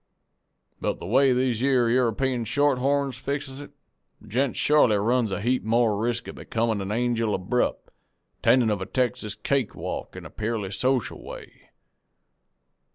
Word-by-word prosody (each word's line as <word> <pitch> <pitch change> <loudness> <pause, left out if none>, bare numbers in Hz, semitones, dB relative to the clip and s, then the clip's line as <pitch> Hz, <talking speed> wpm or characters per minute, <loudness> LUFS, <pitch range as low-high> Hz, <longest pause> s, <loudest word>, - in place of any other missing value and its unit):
But - - -1
the - - -7
way 130 +7 +4
these 125 -2 +1
yere 130 -3 +3
European 125 +1 +1
shorthorns 140 +1 +1
fixes 140 -1 -4
it, 145 - -10 0.5
a - - -18
gent 125 +5 0
shorely 145 -8 +4
runs 115 +2 +1
a 95 - -3
heap 125 +3 0
more 115 -1 +2
resk 120 +1 -1
of - - -6
becomin' 115 -2 -1
a 95 +1 -4
angel 115 -1 0
abrupt, 95 +7 -1 0.5
attendin' 120 -4 +4
of 100 -2 -1
a 95 - -4
Texas 120 -5 -1
cake 125 +3 -1
walk - - -5
in - - -9
a - - -10
purely 105 -3 -3
social 130 +3 -1
way. - - -11
120 Hz, 155 wpm, -25 LUFS, 110-130 Hz, 0.5 s, way